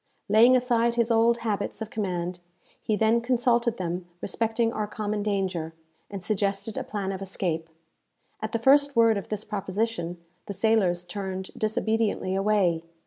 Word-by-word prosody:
Laying 230 +5 +7
aside 235 -2 +2
his 235 0 +2
old 230 +1 +3
habits 205 -2 -2
of 220 -1 -6
command, 180 -4 -3 0.4
he 215 - 0
then 225 +2 +3
consulted 235 -1 +1
them 175 0 -3
respecting 225 +4 0
our 215 -1 -2
common 210 0 -3
danger, 190 -6 -2 0.3
and 200 -3 -6
suggested 200 +1 -1
a - - -2
plan 200 -2 -3
of 195 0 -5
escape. 170 -4 -3 0.7
At 215 - -3
the - - +1
first 280 +4 +4
word 230 -1 +5
of 200 - -5
this 215 -1 -3
proposition, 200 -3 -2 0.3
the 200 - -5
sailors 195 -4 +2
turned 190 +1 -5
disobediently 220 -3 0
away. 195 -4 +2
210 Hz, 150 wpm, -26 LUFS, 190-230 Hz, 0.7 s, Laying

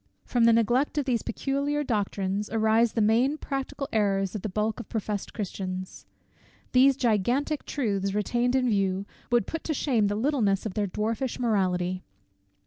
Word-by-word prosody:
From 240 -2 +2
the 230 - +6
neglect 240 +6 +2
of 290 - +1
these 245 -4 +1
peculiar 280 +4 -1
doctrines 205 -4 -1
arise 220 +1 +2
the 225 - +1
main 240 +7 +3
practical 275 -1 -4
errors 195 -3 +1
of 210 - -4
the 215 - -3
bulk 215 +3 -1
of 235 - -8
professed 210 -2 -3
Christians. 185 -3 -5 0.6
These 265 +1 +5
gigantic 250 +6 0
truths 200 -7 -1
retained 240 +4 +1
in 255 -1 +2
view, 195 -3 +1 0.3
would 240 -4 +3
put 325 - -5
to 310 - -1
shame 235 -8 +2
the 205 - -1
littleness 220 -5 +1
of 210 - -3
their 205 0 0
dwarfish 225 +6 -2
morality. 185 -6 0
220 Hz, 160 wpm, -27 LUFS, 200-255 Hz, 0.6 s, the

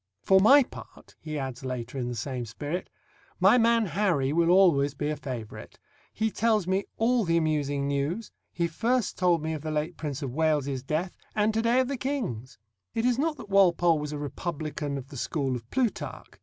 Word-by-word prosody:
"For 190 0 +5
my 270 +8 +7
part," - - -13
he 155 -1 -5
adds 135 -1 -5
later 125 -1 -5
in 120 - -2
the 120 - -4
same 125 +2 -3
spirit, 145 +10 -5 0.5
"my 195 +7 +6
man 230 -1 +4
Harry 165 -7 +1
will 170 +1 +3
always 160 -7 +4
be 145 +1 -2
a 155 - -1
favourite; 125 -7 -7 0.3
he 220 0 -1
tells 220 -3 +1
me 190 +2 0
all 235 +1 +2
the 170 -2 +2
amusing 145 -3 0
news; 140 +10 -2 0.2
he 170 - -1
first 235 +8 0
told 175 -3 +2
me 160 0 -2
of 155 - -5
the 155 - -4
late 155 +3 -2
Prince 150 -2 -4
of 130 -3 -4
Wales's 145 -4 0
death, 155 +7 -2 0.2
and 215 0 +2
to 225 - +1
day 235 +2 +3
of 255 - -1
the 275 0 -3
King's." 230 - -4 0.4
It 225 - 0
is 250 0 +2
not 310 +1 0
that 205 - -10
Walpole 175 -4 +4
was 150 0 -4
a 150 - -4
republican 150 -1 -4
of 135 0 -8
the 140 - -9
school 135 0 -1
of 115 -1 -8
Plutarch. 250 -5 -2
160 Hz, 200 wpm, -27 LUFS, 140-210 Hz, 0.5 s, my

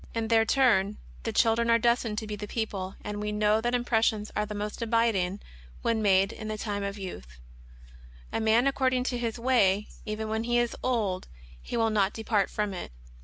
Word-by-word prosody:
In 225 -1 -1
their 225 -1 +4
turn 215 -6 +3 0.2
the 225 - -3
children 230 +1 +3
are 230 - +6
destined 235 -2 +1
to 220 - -2
be 210 -1 -4
the 210 0 -6
people; 195 -4 -3
and 210 0 -4
we 210 0 -2
know 210 +1 +2
that 240 +2 0
impressions 225 -3 +1
are 210 0 0
the 210 - -5
more 210 +1 -3
abiding 220 -5 +1 0.4
when 230 -1 +1
made 195 -1 +3
in 215 - -7
the 215 0 -3
time 205 -1 -3
of 200 +1 -3
youth: 65 - -8 1.0
"A - - +1
young 225 - -1
man 225 +3 +4
according 260 -2 +2
to 250 -1 -2
his 230 -1 -2
way, 210 -5 +2
even 215 0 -4
when 220 +1 -2
he 240 0 +2
is 240 -1 +1
old 210 -7 -1 0.3
he - - -4
will 225 -1 +2
not 205 -2 +2
depart 215 -3 0
from 210 -2 -2
it." 180 - -6
220 Hz, 205 wpm, -28 LUFS, 205-230 Hz, 1.0 s, are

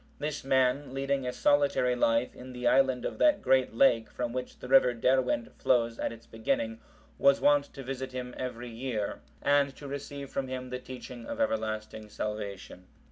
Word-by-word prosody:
This 150 0 -3
man 130 +1 +1
leading 135 -1 -1
a - - 0
solitary 140 -2 +2
life 115 0 +2
in 125 0 -10
the 125 0 -6
island 130 -1 +3
of - - -4
that 305 -1 +5
great 130 -3 +2
lake 115 -3 +4
from 120 -1 -4
which 125 0 -5
the - - -9
river 125 -2 +5
Derwent 125 0 +1
flows 115 -2 +2
at - - -1
its 115 0 -12
beginning,(757) 110 0 -4
was 140 0 +5
wont 145 -1 +4
to 135 - -9
visit 130 0 -5
him 125 -1 -5
every 125 -1 -5
year, 115 -3 -3 0.2
and 140 -1 +3
to 145 - -9
receive 140 0 -6
from 135 -1 -2
him 130 -1 -5
the 125 - -3
teaching 125 -2 -9
of - - -5
everlasting 110 -1 -2
salvation. 100 -3 -5
125 Hz, 180 wpm, -29 LUFS, 115-135 Hz, 0.2 s, that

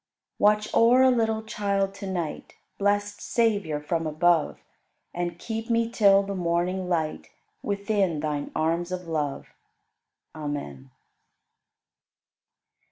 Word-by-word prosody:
27. - - -5
Watch 210 +1 +3
o'er 245 +3 +6
a 260 - +6
little 225 -2 +1
child 200 -2 -1
to 195 0 -7
night, 175 -5 -4 0.2
Blest 205 0 0
Savior 205 -10 0
from 160 +2 -2
above, 160 +1 +2 0.6
And 175 -1 -3
keep 225 +3 -5
me 230 0 +1
till 200 -3 +5
the 200 0 -4
morning 180 +1 -1
light 160 -3 -2 0.3
Within 200 -5 0
Thine 150 -1 -2
arms 165 +3 0
of 180 -1 -5
love. 150 -4 -3 0.8
Amen. 145 - -6
185 Hz, 115 wpm, -26 LUFS, 160-210 Hz, 0.8 s, o'er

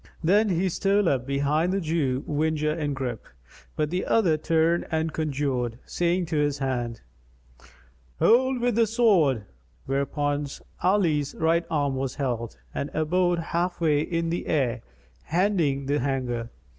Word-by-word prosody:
Then 205 +6 +4
he 185 +1 +1
stole 195 +2 +1
up 130 -4 0
behind 145 +5 +1
the 195 - 0
Jew 155 -6 -1
whinger 155 0 0
in 150 -3 -2
grip; 125 -4 -4 0.5
but 150 0 -1
the 180 +1 -1
other 185 -9 +3
turned 165 +2 +1
and 160 -1 -1
conjured, 135 -6 -1
saying 175 +1 0
to 160 -1 -2
his 145 -1 +1
hand, 120 -4 -2 1.2
"Hold 260 - +4
with 245 0 +2
the 230 +1 +3
sword;" 185 - +3 0.4
whereupon 145 +1 -1 0.3
Ali's 165 -7 +1
right 165 +1 +1
arm 145 -3 0
was 135 -1 -3
held 120 - -3 0.2
and 140 - -3
abode 175 +3 +2 0.2
half 175 +1 0
way 155 -3 +3
in 165 +1 -1
the 175 - -3
air 125 -6 0 0.4
hending 165 -6 +1
the 145 +2 +1
hanger. 125 -3 -2
155 Hz, 145 wpm, -26 LUFS, 140-175 Hz, 1.2 s, Then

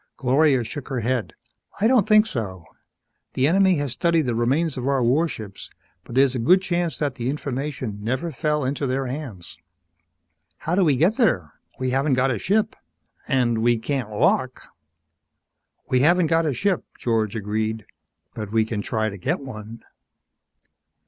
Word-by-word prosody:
Gloria 135 0 +3
shook 140 +4 -7
her 130 -4 -2
head. 120 0 -1 0.5
"I 205 - +2
don't 235 -4 +4
think 215 0 +6
so. 95 - -5 0.7
The 130 - +2
enemy 190 +2 +4
has 145 -4 -2
studied 165 +5 +2
the 125 -3 -1
remains 135 +7 +1
of 130 0 -4
our 135 -2 +2
warships 120 -6 -1 0.3
but 120 - -10
there's 135 -1 +4
a 130 - -2
good 180 +12 +5
chance 175 -5 -1
that 145 -3 -1
the 125 -1 -3
information 135 -5 -4
never 130 +9 -2
fell 150 +1 -1
into 140 +1 -1
their 130 +1 -1
hands." 125 - -7 1.0
"How 165 - -3
do 190 +1 +3
we 150 -5 +3
get 175 - +2
there? 95 - +1 0.3
We 130 0 -1
haven't 135 +1 +2
got 130 +1 +2
a 115 - -2
ship, 210 - +1 0.5
and 120 -3 +1
we 120 +1 +3
can't 130 0 -3
walk!" 125 +4 0 1.2
"We 125 - +2
haven't 175 +6 +4
got 165 0 +2
a 145 - 0
ship," 200 +2 0
George 110 -2 0
agreed. 110 +1 -2 0.5
"But 105 -2 -6
we 110 0 +2
can 110 -2 -3
try 110 +1 -1
to 100 - -8
get - - -1
one." 115 -4 -9
130 Hz, 165 wpm, -23 LUFS, 115-155 Hz, 1.2 s, think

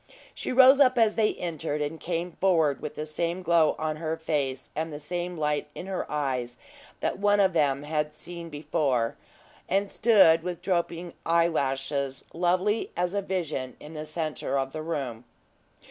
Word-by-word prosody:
She - - -4
rose 265 +2 +7
up 255 -3 +5
as 225 -2 +4
they 215 -1 +1
entered, 160 -3 -3
and 150 +2 -3
came 175 +1 -3
forward 160 -6 +2
with - - -6
the 155 - -4
same 170 +4 -2
glow 165 -2 +4
on 155 -1 -2
her 160 0 -3
face 140 -5 -2
and 160 +2 -2
the 145 - -6
same 175 +3 -4
light 150 -1 -1
in - - -6
her 190 -1 -4
eyes 130 -5 -2 0.4
that - - -1
one 205 0 +3
of 190 -2 +4
them 145 -3 +2
had 150 0 -1
seen 170 +2 -9
before, 140 -6 0 0.5
and 195 +2 +1
stood 195 -8 +5
with 180 0 -5
drooping 175 -2 -1
eyelashes, 140 -5 0
lovely 185 +5 +1
as 175 +1 0
a 200 - 0
vision 155 -10 -3
in 150 - -11
the 155 -1 -5
centre 155 -2 -2
of 135 0 -2
the 155 - -4
room. 135 -8 -4
160 Hz, 170 wpm, -27 LUFS, 150-180 Hz, 0.5 s, rose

